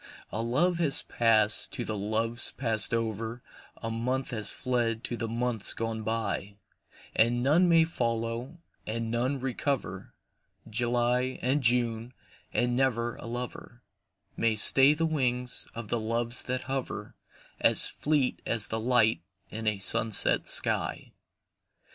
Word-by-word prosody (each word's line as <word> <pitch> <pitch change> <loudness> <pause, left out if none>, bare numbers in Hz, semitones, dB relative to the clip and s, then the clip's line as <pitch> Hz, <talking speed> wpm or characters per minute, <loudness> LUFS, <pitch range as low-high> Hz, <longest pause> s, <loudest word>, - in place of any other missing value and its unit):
A 105 - -3
love 160 +10 +1
has 155 -5 +4
passed 110 -2 +3
to - - -4
the 110 - -3
loves 110 +3 0
passed 110 -4 +1
over, 115 +1 -3 0.4
A 115 - -3
month 125 +4 -2
has 110 -4 -3
fled 120 -3 -1
to 120 - -4
the 115 -1 -4
months 115 -2 -1
gone 115 -1 -3
by; 110 -2 -3 0.6
And 120 +2 +3
none 165 +7 +4
may 165 -1 +6
follow, 115 0 -3 0.3
and 115 +1 -3
none 130 +4 -1
recover 135 0 -3 0.5
July 120 +2 0
and 135 +4 +1
June, 120 0 0 0.4
and 120 +2 0
never 120 -3 0
a - - -9
lover 120 0 -7 0.5
May 115 -1 +1
stay 135 +6 +6
the 165 +2 0
wings 125 -5 -1
of 115 -2 -7
the 120 - 0
Loves 115 +2 -2
that 130 0 -2
hover, 135 -1 -5 0.5
As - - +5
fleet 145 -4 0
as 115 -3 0
the 110 - -2
light 110 -6 +3 0.3
in 110 0 -5
a 105 -1 +2
sunset 105 +2 +3
sky. - - 0
120 Hz, 135 wpm, -28 LUFS, 115-130 Hz, 0.6 s, may